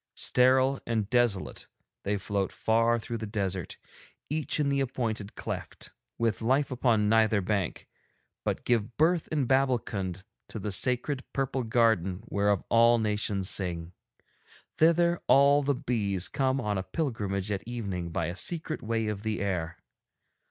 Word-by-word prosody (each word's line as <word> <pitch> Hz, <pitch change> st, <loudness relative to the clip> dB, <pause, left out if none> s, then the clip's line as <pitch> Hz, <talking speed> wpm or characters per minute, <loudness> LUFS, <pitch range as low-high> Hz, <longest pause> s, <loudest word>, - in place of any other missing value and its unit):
Sterile 130 Hz, +2 st, +3 dB
and 110 Hz, -3 st, 0 dB
desolate 120 Hz, -6 st, 0 dB, 0.3 s
they 105 Hz, +1 st, -1 dB
float 100 Hz, 0 st, -2 dB
far 115 Hz, +1 st, +2 dB
through 115 Hz, 0 st, -5 dB
the 110 Hz, -, -5 dB
desert, 95 Hz, -5 st, -3 dB, 0.5 s
each 155 Hz, 0 st, -1 dB
in 145 Hz, -2 st, +2 dB
the 140 Hz, 0 st, +1 dB
appointed 115 Hz, -6 st, -3 dB
cleft, -, -, -6 dB, 0.3 s
with 115 Hz, -1 st, 0 dB
life 135 Hz, +5 st, +1 dB
upon 120 Hz, -4 st, +2 dB
neither 110 Hz, -1 st, +4 dB
bank, 100 Hz, -2 st, -2 dB, 0.6 s
but -, -, -2 dB
give 120 Hz, -1 st, 0 dB
birth 165 Hz, +2 st, +2 dB
in 150 Hz, -4 st, 0 dB
Babbulkund 115 Hz, -8 st, 0 dB, 0.3 s
to -, -, -7 dB
the 105 Hz, 0 st, -4 dB
sacred 130 Hz, +6 st, +1 dB
purple 135 Hz, -1 st, -1 dB
garden 110 Hz, -5 st, +1 dB
whereof 100 Hz, -3 st, +1 dB
all 115 Hz, +1 st, +5 dB
nations 105 Hz, -3 st, -1 dB
sing. 90 Hz, -3 st, -3 dB, 0.9 s
Thither 170 Hz, +2 st, +4 dB
all 140 Hz, +1 st, +6 dB
the 140 Hz, 0 st, +1 dB
bees 100 Hz, -7 st, -1 dB
come 135 Hz, 0 st, 0 dB
on 105 Hz, -5 st, -1 dB
a -, -, -3 dB
pilgrimage 105 Hz, -, -2 dB
at 100 Hz, -, -1 dB
evening 100 Hz, -8 st, -4 dB
by 85 Hz, +1 st, -2 dB
a 85 Hz, +2 st, -4 dB
secret 160 Hz, -, -2 dB
way 115 Hz, 0 st, -1 dB
of 105 Hz, -2 st, -3 dB
the 110 Hz, 0 st, -2 dB
air. 90 Hz, -5 st, -2 dB
110 Hz, 145 wpm, -28 LUFS, 100-130 Hz, 0.9 s, all